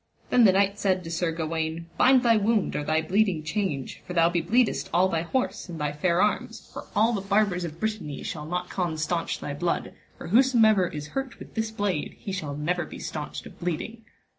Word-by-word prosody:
Then 245 -2 +6
the 195 - +7
knight 200 +1 +2
said 185 -2 +1
to 165 - -7
Sir 170 0 0
Gawaine, 160 0 -3
bind 260 -1 +5
thy 230 -2 +5
wound 215 -1 +1
or 150 - -1
thy 155 +2 +1
blee[ding] 185 -2 +1
change, 155 -7 -2
for 180 - -5
thou 170 -1 +4
be 175 -1 0
bleedest 225 +8 +1
all 180 +2 +4
thy 165 -4 0
horse 230 +2 -2
and 165 -2 -6
thy 150 -1 -1
fair 170 +4 +2
arms, 210 - -2
for - - -8
all 220 +3 +4
the 200 - -1
barbers 195 -2 +1
of 165 0 -8
Brittany 215 -10 -3
shall 150 -1 -5
not 180 +2 -2
con 175 -4 -2
staunch 165 +2 -1
thy 145 - -4
blood, 170 +4 -2 0.2
for - - -8
whosomever 220 -4 +5
is 150 -2 -6
hurt 270 +1 -4
with - - -12
this 220 -1 -1
blade 205 -7 -2
he 195 - -6
shall 155 -7 -4
never 175 +4 0
be - - -9
staunched 150 -1 -6
of - - -13
bleeding. 180 +7 -4
180 Hz, 215 wpm, -26 LUFS, 160-215 Hz, 0.2 s, the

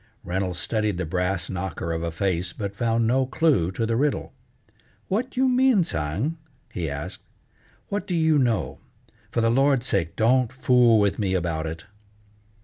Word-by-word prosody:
Reynolds 90 0 -2
studied 105 0 -1
the 90 - -2
brass 90 +2 -1
knocker 90 -3 -4
of 80 0 -2
a 85 - -2
face, 90 +1 -1
but 100 -1 -5
found 115 +1 +1
no 130 +3 +2
clue 135 - +2
to 115 - -1
the 115 0 0
riddle. 145 +4 -1 0.8
"What 235 +7 -2
you 260 +1 +4
mean, 255 -5 +4
Tsang?" 100 - -2 0.3
he 85 -4 -2
asked. 70 0 -5 0.7
"What 200 -2 -3
do 180 - -1
you 160 -2 +3
know? 110 - 0 0.5
For 115 - 0
the 115 0 +3
Lord's 135 0 +3
sake 85 -8 -1
don't 120 +1 +3
fool 125 -3 +4
with 100 0 +1
me 95 -3 0
about 85 -3 -1
it!" 80 +1 -7
110 Hz, 165 wpm, -24 LUFS, 90-135 Hz, 0.8 s, you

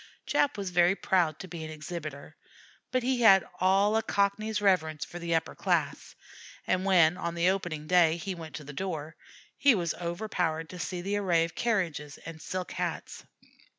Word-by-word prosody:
Jap 285 -5 +1
was 195 -2 -4
very 175 +1 +4
proud 170 -6 +1
to 190 - -8
be 170 -3 -7
an 155 - -6
exhibitor; 155 -2 -7 0.5
but 255 -1 0
he 255 0 0
had 195 -4 +6
all 195 +3 +3
a 225 - +3
Cockney's 210 +1 0
reverence 160 -7 +1
for 175 - -9
the 170 -1 -1
upper 160 - -1
class, - - -1 0.5
and 185 +1 0
when 175 -3 +5
on 170 -2 -3
the 170 +2 +3
opening 175 -6 -4
day 170 -1 +4
he 190 +2 -4
went 160 -3 -9
to 150 - -7
the 145 +1 -9
door, 160 -2 -4 0.4
he 280 -4 +6
was 170 -4 -1
overpowered 170 -2 -2
to 180 - -9
see 180 0 -3
the 200 +3 -1
array 175 -5 +2
of 165 - -4
carriages 170 - -1
and 160 -1 -8
silk 185 -2 -4
hats. - - -4
175 Hz, 185 wpm, -29 LUFS, 160-195 Hz, 0.5 s, had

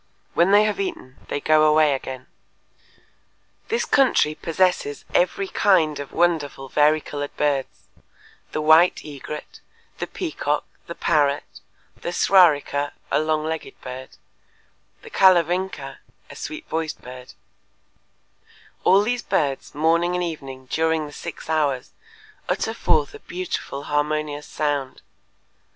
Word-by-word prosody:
When 170 +2 +3
they 205 +1 +6
have 215 - -1
eaten 350 - -5
they - - -2
go 155 +1 +4
away 155 -1 +5
again." 130 -1 -5 1.4
"This 460 +2 0
country 260 - +3
possesses 165 -2 0
every 190 +2 +1
kind 165 -8 +2
of 145 - -7
wonderful 155 -6 0
varicolored 150 -1 +1
birds, 140 -3 -1 0.7
the 155 - -2
white 160 +3 +5
egret, 150 +1 -8 0.4
the - - -3
peacock, - - -2 0.2
the - - -6
parrot, 145 -1 +2 0.5
the 175 - -5
s'rarika 150 -6 +3 0.2
(a - - +3
long 155 0 0
legged 160 0 -5
bird), 130 +1 -9 0.9
the - - -12
Kalavingka 185 0 +2 0.3
(a - - -11
sweet 310 +1 -7
voiced 160 -1 -3
bird)… 125 0 -10 1.5
All 195 +2 +5
these 245 +2 -1
birds, 140 - -1
morning 170 +3 +2
and 180 - 0
evening 135 -6 -6
during 160 -1 +1
the 145 - -9
six 170 +2 -8
hours, 145 -4 0 0.6
utter 225 - -1
forth 150 -9 +1
a - - -10
beautiful 175 -5 -5
harmonious 150 0 -1
sound. 145 -3 -2
155 Hz, 120 wpm, -23 LUFS, 145-175 Hz, 1.5 s, they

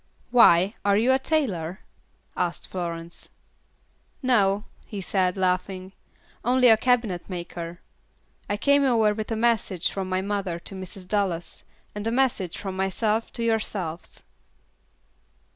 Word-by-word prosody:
"Why, 195 -5 +6
are 200 0 +3
you 235 +5 +3
a 260 - +4
tailor?" 200 - -1 0.5
asked 175 -1 -2
Florence. 170 -2 -6 0.9
"No," 205 -5 +3 0.2
he 205 - -6
said, 185 -1 0
laughing, 185 0 -1 0.5
"only 250 +1 +5
a 225 - +8
cabinetmaker. 180 -7 -1 0.7
I 205 - 0
came 280 +5 +4
over 225 -5 +3
with 215 0 -5
a - - +1
message 220 -6 +1
from 190 -1 -4
my 185 0 0
mother 200 -4 -2
to 170 - -8
Mrs. 185 0 -8
Dallas, 185 -4 -1 0.3
and 210 +1 -4
a - - +1
message 235 -9 0
from 195 -2 -5
myself 210 +4 0
to 235 - -4
yourselves." 205 -7 -2
195 Hz, 125 wpm, -25 LUFS, 180-225 Hz, 0.9 s, a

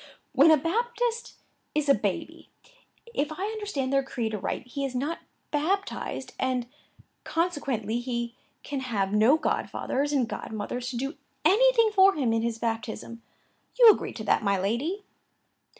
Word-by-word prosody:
"When 275 +4 +6
a 315 - +7
Baptist 470 - -1 0.4
is 300 -1 +1
a 280 - +7
baby, - - -3 0.6
if 295 -6 -1
I 365 +6 -3
understand 405 -12 -3
their 275 - +4
creed 240 -5 -3
aright, 210 +4 -3
he 275 +3 -5
is 265 -2 -3
not 290 +6 -2 0.3
baptized; 330 -2 -2
and, 255 -2 0 0.6
consequently, 275 - -1
he 235 -1 -3 0.3
can 285 -2 -3
have 210 -7 -1
no 220 +8 +5
godfathers 290 -2 -1
and 265 -5 +2
godmothers 240 +3 -4
to 245 - -4
do 270 +5 -3 0.3
anything 460 +1 +5
for 390 -1 +6
him 250 -6 +1
in 225 - +1
his 230 0 -1
baptism; 230 0 -4 0.6
you 470 -3 +11
agree - - -3
to 220 - -7
that, 210 - +2
my 200 -2 +1
lady?" 255 - -1
270 Hz, 150 wpm, -27 LUFS, 235-335 Hz, 0.6 s, you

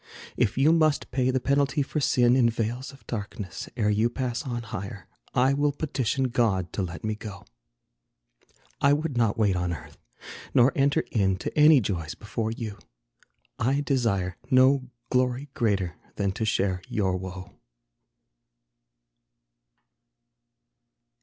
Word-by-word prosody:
If 120 -2 +1
you 140 +4 +5
must 155 -3 +2
pay 130 0 +1
the 130 0 +1
penalty 140 +1 +1
for 150 - -3
sin, 125 -3 +3
In 120 -3 +4
vales 115 +3 -3
of 135 - -18
darkness, 100 -4 -6
ere 105 -3 +2
you 110 +3 +2
pass 120 -1 -3
on 120 -3 -4
higher, 100 -3 -7 0.3
I 130 +2 +4
will 145 +1 +2
petition 135 -3 -1
God 105 -8 0
to - - -1
let 90 -2 -5
me 110 0 -1
go. 105 -2 -9 1.4
I 140 0 +5
would 150 -1 -1
not 115 -2 +2
wait 105 -4 +2
on 90 -1 -1
earth, 85 - -8 0.6
nor 125 +2 +6
enter 140 +3 +2
in 95 -4 +2
To - - -5
any 150 -2 +7
joys 85 -7 -3
before 110 +1 -3
you. 110 -3 -5 0.8
I 135 +5 +1
desire 105 -11 0
No 130 0 +4 0.2
glory 125 +2 +1
greater 100 -8 0 0.2
than 100 -1 0
to 110 +4 -3
share 95 -3 0
your 95 -3 0
woe. 95 +1 -7
120 Hz, 140 wpm, -26 LUFS, 100-135 Hz, 1.4 s, any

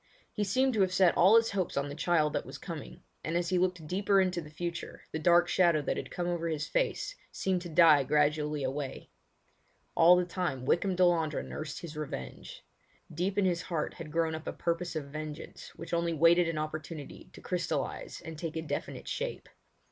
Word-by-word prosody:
He 210 - -1
seemed 260 +6 +2
to 215 - +2
have 190 -1 +3
set 185 -2 +4
all 190 +6 +6
his 230 0 +4
hopes 190 -6 -2
on 140 0 0
the 145 - -6
child 155 -1 +1
that - - -1
was - - -9
coming, - - -8 0.2
and 165 +2 -1
as 175 -1 -1
he 185 -1 +2
looked 180 -3 0
deeper 195 +4 +2
into 185 -2 +1
the 150 - -11
future 170 +2 -5
the 160 - -3
dark 175 +2 +5
shadow 170 -3 +3
that - - -1
had - - -5
come 175 - -3
over 170 -1 -1
his 155 -2 -2
face - - -1 0.2
seemed 185 -2 -1
to 175 - -7
die 160 -3 +6
gradually 150 +1 +1
away. 135 +1 -4 0.8
All 170 +2 +7
the 180 0 +2
time 175 -8 -3
Wykham 185 +6 +2
Delandre 170 -4 +2
nursed 155 -2 -6
his 165 -3 -8
revenge. 150 -2 -7 0.5
Deep 180 +5 -1
in 200 - +3
his 175 -2 +1
heart 160 -4 -3
had 165 -3 -9
grown 165 0 +1
up 160 0 -6
a - - -2
purpose 170 0 -2
of 155 -2 -3
vengeance 155 +2 -7
which 165 +1 -8
only 170 0 +1
waited 165 +2 +5
an 165 - -3
opportunity 155 0 -6
to - - -11
crystallise - - -3
and 160 -1 -8
take 165 -2 -4
a 160 - -2
definite 160 - -5
shape. - - -4
170 Hz, 200 wpm, -30 LUFS, 155-180 Hz, 0.8 s, All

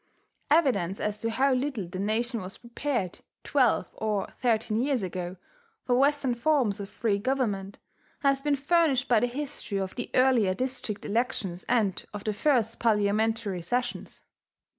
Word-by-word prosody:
Evidence 260 - +2
as 210 0 -2
to 230 - 0
how 265 +4 +2
little 255 -7 -1
the 185 +2 -6
nation 225 +3 0
was 185 +2 -7
prepared, 235 -5 -3 0.2
twelve 260 -6 +2
or 210 -3 -1
thirteen 225 -2 +1
years 265 -4 0
ago, 180 0 -4 0.5
for 250 - +1
Western 275 0 +3
forms 240 -5 +2
of 200 -1 -6
free 210 -3 0
government, 205 -5 -1 0.4
has 275 -1 +2
been 295 0 +2
furnished 280 -2 +2
by 235 -3 +5
the 245 - +1
history 265 -5 -4
of 190 -1 -3
the 245 - -5
earlier 250 -7 +4
district 250 -3 -3
elections 205 -5 -1
and 220 -6 +1
of 205 - -6
the 215 - -1
first 230 -1 +1
parliamentary 215 -2 +1
sessions. 245 +8 -3
230 Hz, 150 wpm, -28 LUFS, 200-265 Hz, 0.5 s, by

